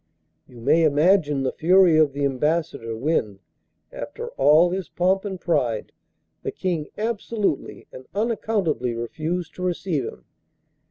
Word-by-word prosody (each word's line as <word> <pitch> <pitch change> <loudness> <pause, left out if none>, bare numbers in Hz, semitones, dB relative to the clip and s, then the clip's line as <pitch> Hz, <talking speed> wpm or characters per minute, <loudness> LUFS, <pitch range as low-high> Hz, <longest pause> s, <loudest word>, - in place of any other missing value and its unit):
You 120 -2 -14
may 150 +7 +4
imagine 150 -1 +3
the 130 - 0
fury 180 0 +4
of 155 -2 +4
the 140 +1 -1
Ambassador 140 -4 -1
when, 115 -7 0 0.5
after - - -6
all 155 +6 +4
his 190 0 -3
pomp 190 +3 +1
and 190 -2 -4
pride, 135 -11 -1 0.5
the - - -3
King 170 -5 -2
absolutely 215 -5 -2
and 130 0 -11
unaccountably 205 - -1
refused 160 +8 -4
to - - -7
receive 175 -6 -1
him. 65 - -9
160 Hz, 130 wpm, -23 LUFS, 135-185 Hz, 0.5 s, may